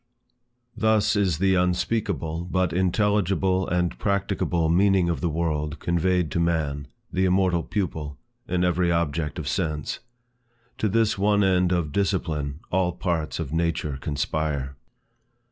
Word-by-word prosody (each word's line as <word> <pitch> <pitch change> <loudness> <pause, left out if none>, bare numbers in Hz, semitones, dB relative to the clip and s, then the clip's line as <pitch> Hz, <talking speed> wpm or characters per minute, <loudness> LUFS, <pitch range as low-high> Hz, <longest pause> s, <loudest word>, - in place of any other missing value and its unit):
THUS 110 -1 +2
is 95 -6 +1
the 95 +2 +2
unspeakable 90 -3 0
but 95 -2 +1
intelligible 95 0 +1
and 90 -1 0
practicable 100 -4 0
meaning 95 +1 +3
of 80 -6 -2
the 85 - +1
world 75 -2 -2
conveyed 85 0 0
to 85 - -1
man, 75 -4 0 0.3
the 95 +1 +2
immortal 90 -2 +2
pupil, 80 - -3 0.3
in 90 0 0
every 90 0 +2
object 80 -3 -1
of - - -5
sense. 75 -2 -2 0.8
To 110 - +1
this 110 -1 +1
one 105 0 +3
end 90 -1 +3
of 85 -4 0
Discipline, 80 -6 -1
all 90 -1 +1
parts 85 -4 -2
of 80 -3 -4
nature 80 -4 -1
conspire. 70 -1 -2
85 Hz, 130 wpm, -25 LUFS, 80-95 Hz, 0.8 s, meaning